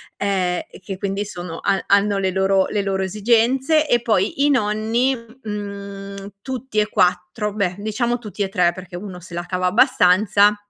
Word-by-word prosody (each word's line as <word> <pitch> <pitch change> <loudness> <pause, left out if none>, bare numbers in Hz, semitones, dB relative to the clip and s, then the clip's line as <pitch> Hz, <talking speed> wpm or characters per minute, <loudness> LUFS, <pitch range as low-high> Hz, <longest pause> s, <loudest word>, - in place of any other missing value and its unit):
ehm, 185 -3 0
e - - -12
che 195 0 -6
quindi 200 +1 -2
sono 175 -4 -7
ha 195 -1 0
hanno 200 0 +3
le 190 -1 0
loro 190 0 +2
le 205 - -1
loro 195 -1 -1
esigenze. 240 - +2
E 240 -4 +3
poi 225 +5 +1
i - - +4
nonni, 225 +1 +1 0.3
mhmm, 200 -1 -7
tutti 260 -2 -3
e 210 - +2
4, 180 +4 0
beh, 185 -4 -1
diciamo 235 +3 -1
tutti 210 -3 -5
e 195 - -2
3 180 -2 +2
perché 185 0 -10
1 180 -1 -7
se 175 0 -13
la 175 0 -3
cava 180 0 -2
abbastanza, 205 -2 +4
200 Hz, 175 wpm, -21 LUFS, 190-215 Hz, 0.3 s, i